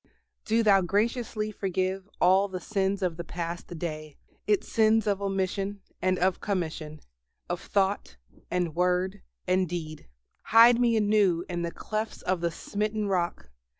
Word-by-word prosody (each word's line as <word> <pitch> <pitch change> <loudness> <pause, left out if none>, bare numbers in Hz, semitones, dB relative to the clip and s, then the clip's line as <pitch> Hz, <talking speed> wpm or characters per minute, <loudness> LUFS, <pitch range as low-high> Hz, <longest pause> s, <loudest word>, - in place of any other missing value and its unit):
Do 225 +1 +2
Thou 200 -3 +5
graciously 215 +3 -1
forgive 190 0 -2
all 190 +2 +4
the 185 -2 -5
sins 195 -1 -1
of 175 -3 -1
the 170 - -4
past 170 0 -5
day, 155 -3 -5 0.3
its 210 -2 +2
sins 220 -1 +3
of 200 -2 0
omission 195 +1 -2 0.2
and 185 0 +2
of 185 0 +1
commission, 160 -6 -3 0.5
of 175 0 -3
thought, 195 - -1 0.3
and 175 -3 -1
word, 180 +2 +1 0.3
and 185 -1 +2
deed. 155 -3 -6 0.4
Hide 230 +1 +7
me 235 -2 +3
anew 205 -5 +2
in 175 -2 -3
the 170 - -1
clefts 215 +5 -4
of 185 -2 0
the 170 - +1
Smitten 210 +4 -2
Rock. 175 - -2
190 Hz, 150 wpm, -28 LUFS, 175-205 Hz, 0.5 s, Hide